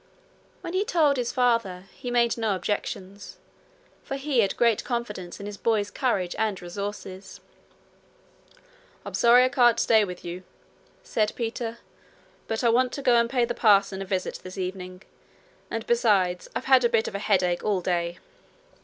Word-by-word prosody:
When 340 - -6
he 375 +2 +1
told 315 - +2
his 245 -1 -1
father, 230 -8 +1
he 245 - -7
made 235 -1 +2
no 220 -4 0
objection, 195 +1 -4 0.8
for 275 - -5
he 275 -2 -1
had 200 -3 +1
great 235 -3 +2
confidence 210 -8 -5
in 200 - -7
his 205 0 -7
boy's 210 -1 0
courage 195 -9 -1
and 215 -3 0
resources. 195 +1 -7 1.7
'I'm - - -7
sorry 240 +1 +6
I 255 - +3
can't 240 -3 +4
stay 220 -2 +4
with 180 -3 -7
you,' 175 +1 -6 0.6
said 215 -2 0
Peter; 230 0 -4 0.7
'but 225 +2 -2
I 235 - +4
want 250 +2 +2
to 280 - -5
go 250 -2 +4
and 235 0 +2
pay 245 -1 +2
the 240 - -3
parson 200 -4 +3
a - - -4
visit 185 -1 -3
this 185 +1 -10
evening, 185 0 -6 0.7
and 225 -1 -4
besides 200 -7 +1
I've - - -3
had 265 -2 +5
a 240 - +3
bit 225 -1 +1
of - - -5
a 200 - -3
headache 185 -4 +1
all 205 -3 +1
day.' 175 -1 -1
220 Hz, 170 wpm, -25 LUFS, 190-240 Hz, 1.7 s, sorry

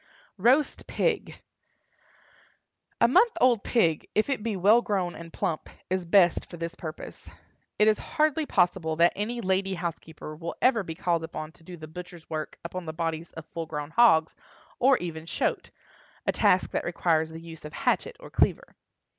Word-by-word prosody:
ROAST 260 +8 +2
PIG. - - -1 1.6
A 235 - +6
month 405 - +4
old 245 -7 +4
pig, 165 -10 +1
if 215 +6 +2
it 270 - -1
be 220 -1 -2
well 205 +6 +5
grown 190 -6 -1
and 165 0 -10
plump, 155 - -3 0.2
is 185 -1 0
best 175 -1 +4
for 175 - -9
this 165 0 -4
purpose. 155 -1 -9 0.5
It 210 - +4
is 215 -1 +4
hardly 310 0 0
possible 175 -3 +1
that 170 +2 +4
any 235 +4 -2
lady 190 0 0
housekeeper 160 -3 -6
will 170 +2 -6
ever 245 -4 +3
be 165 -4 -6
called 170 -1 0
upon 155 -1 -6
to 165 - -21
do 175 +1 -10
the 155 -1 -9
butcher's 175 0 -10
work 155 -1 -4
upon 180 +1 -5
the 160 - -4
bodies 165 0 -3
of 160 - -9
full 165 0 -6
grown 150 0 -5
hogs, 165 -8 +5 0.4
or 265 +1 +5
even 160 -2 -6
"shoat"—a - - -4
task 185 - +3
that - - -1
requires 165 -2 +1
the 160 0 -8
use 165 -1 -11
of 150 0 -9
hatchet - - 0
or - - -12
cleaver. - - +1
175 Hz, 170 wpm, -27 LUFS, 160-210 Hz, 1.6 s, A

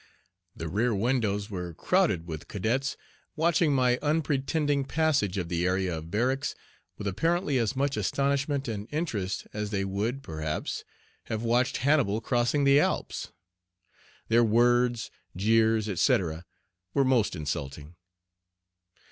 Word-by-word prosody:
The 80 - -5
rear 110 +7 +1
windows 105 -2 0
were 90 -3 -5
crowded 160 - +1
with 80 -3 -7
cadets 120 +7 -1 0.4
watching 165 -1 +2
my 125 -2 +3
unpretending 145 -1 +1
passage 140 - +1
of 90 -3 -2
the 85 0 -1
area 95 -1 0
of 80 +1 -7
barracks 130 +8 0 0.4
with 105 - -6
apparently 150 - +1
as 115 +3 0
much 140 +1 0
astonishment 140 0 0
and 105 -2 -4
interest 115 - -2
as 105 0 -3
they 100 -2 -1
would, 110 +8 -2
perhaps, 80 -1 -4 0.4
have 110 0 -3
watched 120 +2 +2
Hannibal 140 -8 +3
crossing 120 +4 +1
the 140 +1 +6
Alps. - - -1 1.0
Their 115 +1 +4
words, 120 +1 +2 0.2
jeers, 110 +2 +3
etc., 90 - +1 0.5
were 140 - +4
most 125 -7 +2
insulting. 75 0 -5
115 Hz, 125 wpm, -28 LUFS, 95-140 Hz, 1.0 s, the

